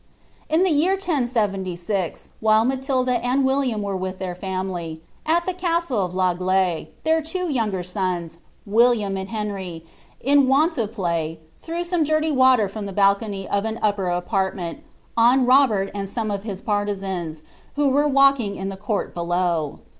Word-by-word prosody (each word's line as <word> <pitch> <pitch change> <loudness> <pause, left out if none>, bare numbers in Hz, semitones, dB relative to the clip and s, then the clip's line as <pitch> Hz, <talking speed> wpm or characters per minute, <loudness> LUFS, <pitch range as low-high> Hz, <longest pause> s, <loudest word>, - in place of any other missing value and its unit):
"' - - -33
I - - +3
ihe 355 +4 +4
year 340 +2 +3
1070, 235 - -1 0.6
while 220 0 +4
Matilda 255 -2 0
and 260 +2 +2
William 265 -5 +1
were 200 -1 -2
with 185 0 -4
their 185 -1 -4
family, 180 -3 -4 0.3
p 340 +3 +2
castle 335 - 0
of 180 0 -4
L'Aigle, 185 -1 +1 0.2
their 320 0 +2
two 360 +4 -3
younger 210 -8 -1
sons, 180 -3 -3 0.3
William 215 -2 +3
and 190 0 -5
Henry, 195 -6 -5 0.3
in 280 0 +4
^_ 285 +5 +4
IDB 230 -9 -2
play, 170 -6 -2 0.2
threw 335 +1 -4
some 350 -2 0
dirty 310 +1 +1
water 260 -6 +4
from 200 +1 -6
the 195 - -6
balcony 200 0 +2
of 200 0 0
an 220 0 -3
upper 205 -2 +1
TrjSnment, 180 0 -1 0.4
on 245 +3 +5
Robert 245 -7 +4
and 200 -1 -4
aome 215 0 -2
of 200 - -3
hia 200 -2 -5
partisans, 190 -6 -2 0.3
who 290 -1 +2
were 290 +2 +3
walking 275 -7 +3
in 195 0 -4
cnutl 205 +2 -3
below. 170 -3 -1
210 Hz, 155 wpm, -23 LUFS, 190-265 Hz, 0.6 s, on